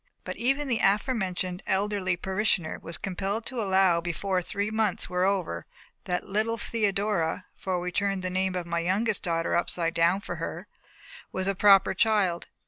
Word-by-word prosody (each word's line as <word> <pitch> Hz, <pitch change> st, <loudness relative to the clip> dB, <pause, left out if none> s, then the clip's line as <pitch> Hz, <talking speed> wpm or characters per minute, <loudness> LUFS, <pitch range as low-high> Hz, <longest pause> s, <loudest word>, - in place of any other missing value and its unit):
But -, -, -5 dB
even 275 Hz, +4 st, +1 dB
the 235 Hz, -4 st, +1 dB
aforementioned 195 Hz, -4 st, 0 dB
elderly 190 Hz, -2 st, 0 dB
parishioner 190 Hz, -3 st, 0 dB
was 165 Hz, -, -5 dB
compelled 200 Hz, +4 st, -3 dB
to 255 Hz, -3 st, -3 dB
allow 190 Hz, -4 st, +3 dB
before 180 Hz, +2 st, -1 dB
three 200 Hz, +4 st, -2 dB
months 220 Hz, -5 st, 0 dB
were 180 Hz, +1 st, +2 dB
over 195 Hz, -2 st, -1 dB, 0.4 s
that 180 Hz, -2 st, -2 dB
little 220 Hz, +3 st, 0 dB
Theodora 205 Hz, -6 st, 0 dB
for 185 Hz, -2 st, -2 dB
we 180 Hz, 0 st, -3 dB
turned 195 Hz, 0 st, -1 dB
the 185 Hz, -, -2 dB
name 185 Hz, 0 st, 0 dB
of 180 Hz, -1 st, -2 dB
my 170 Hz, 0 st, -1 dB
youngest 195 Hz, +5 st, +1 dB
daughter 165 Hz, -1 st, 0 dB
upside 170 Hz, -1 st, 0 dB
down 170 Hz, +3 st, +3 dB
for -, -, -5 dB
her -, -, -5 dB, 0.6 s
"was 190 Hz, -, -2 dB
a 195 Hz, -, +2 dB
proper 195 Hz, 0 st, +5 dB
child." 195 Hz, -4 st, +2 dB
190 Hz, 165 wpm, -27 LUFS, 180-210 Hz, 0.6 s, proper